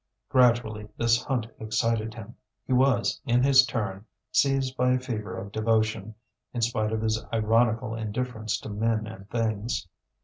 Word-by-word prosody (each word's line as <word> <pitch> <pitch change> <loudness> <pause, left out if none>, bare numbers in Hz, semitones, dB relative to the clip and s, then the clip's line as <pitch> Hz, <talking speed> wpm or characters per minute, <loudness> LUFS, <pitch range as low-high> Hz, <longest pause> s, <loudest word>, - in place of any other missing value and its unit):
Gradually 115 -4 +2
this 115 0 +2
hunt 125 -5 -1
excited 110 0 -1
him; 115 0 -10 0.3
he 130 - -1
was, 125 -2 +2
in 125 -1 +2
his 135 -1 +6
turn, 100 -4 -3 0.3
seized 135 -2 +2
by 125 0 +3
a 130 - +1
fever 115 -5 -5
of 100 +1 -7
devotion, 110 -1 0 0.4
in 120 - -1
spite 110 -2 0
of 110 0 -1
his 110 0 0
ironical 115 +1 +2
indifference 110 0 -3
to - - -7
men 110 +1 0
and 105 -2 -10
things. 110 -3 -2
115 Hz, 150 wpm, -27 LUFS, 110-125 Hz, 0.4 s, his